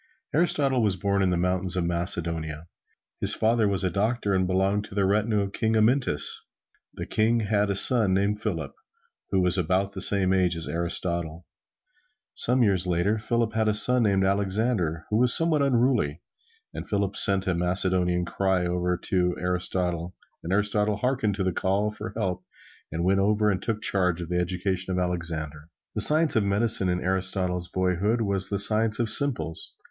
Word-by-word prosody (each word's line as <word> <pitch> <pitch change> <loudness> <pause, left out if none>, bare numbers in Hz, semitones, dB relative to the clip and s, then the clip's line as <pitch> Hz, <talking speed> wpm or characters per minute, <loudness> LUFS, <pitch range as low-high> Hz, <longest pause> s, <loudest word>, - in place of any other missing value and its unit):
Aristotle 140 -5 +1
was 105 -3 0
born 100 +1 -1
in 95 - +1
the 90 - 0
mountains 90 +1 -2
of 90 - -1
Macedonia. 85 -3 -3 0.5
His - - +4
father 110 -1 +1
was 95 -3 -1
a 90 - -1
doctor 105 +2 -1
and 95 -1 0
belonged 95 +2 0
to 100 - -12
the 100 -1 +1
retinue 105 +2 0
of 100 0 -5
King 110 0 -1
Amyntas. 110 - +1 0.6
The - - -6
King 115 +2 0
had 105 -1 0
a 100 - -1
son 110 0 +7
named 100 +2 -1
Philip, 85 -10 -4 0.6
who 95 - +1
was 90 +1 +2
about 95 +3 -1
the 95 -1 -7
same 95 -1 +2
age 90 -2 +1
as 80 0 -3
Aristotle. 85 -1 -3 0.9
Some 125 +1 +1
years 95 -4 0
later, 90 +5 0
Philip 115 0 -2
had 110 -1 0
a 105 - +1
son 125 +3 +2
named 100 -3 +1
Alexander, 100 -4 -1
who 105 - +1
was 125 0 +3
somewhat 165 -3 0
unruly, 120 - 0 0.5
and - - -8
Philip 100 -1 -2
sent 95 -1 +3
a 95 - 0
Macedonian 90 0 +2
cry 95 0 -1
over 90 0 -2
to 90 0 -1
Aristotle, 90 -1 -3 0.3
and 85 - -6
Aristotle 105 +1 0
harkened 115 -3 -1
to 95 - -3
the 95 -1 -1
call 100 +4 -1
for 105 +1 -8
help 90 -4 -3 0.5
and 80 +2 -3
went 95 +2 +1
over 105 +1 +1
and 95 -1 -3
took 110 -1 -4
charge 90 -3 0
of 85 -1 -7
the 90 0 -1
education 95 +1 -2
of 90 - -2
Alexander. 80 -4 -3 0.2
The - - -2
science 155 +1 +6
of 110 - +2
medicine 100 -1 +3
in 90 0 -2
Aristotle's 95 -1 -2
boyhood 95 +6 -1
was 100 -2 -1
the 100 - -2
science 110 +2 +4
of 120 - -1
simples. 105 - +2
95 Hz, 180 wpm, -25 LUFS, 90-105 Hz, 0.9 s, son